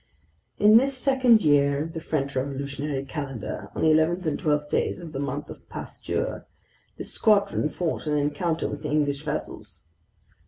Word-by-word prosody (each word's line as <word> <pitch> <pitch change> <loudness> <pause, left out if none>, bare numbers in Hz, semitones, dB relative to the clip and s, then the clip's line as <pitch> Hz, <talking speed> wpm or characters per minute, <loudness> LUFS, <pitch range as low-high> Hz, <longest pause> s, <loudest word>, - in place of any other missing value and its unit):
In 210 +2 +7
this 265 +2 +2
second 255 -5 +4
year 140 -1 +3
of 165 +1 -7
the 165 - -4
French 140 -4 -2
Revolutionary 140 +1 -3
Calendar, 135 -5 -5
on - - -2
the 160 - +5
11th 160 +3 +3
and 155 -2 -1
12th 150 -1 +1
days - - 0
in 170 -3 -8
the 135 - -5
Month 140 +1 -3
of - - -13
Pasture, - - -4 0.5
this - - -7
squadron 200 -7 +2
fought 165 -1 -3
an 150 0 +1
encounter 150 +3 0
with 145 - -6
English 145 -1 0
vessels. 150 -1 -6
150 Hz, 160 wpm, -25 LUFS, 140-175 Hz, 0.5 s, In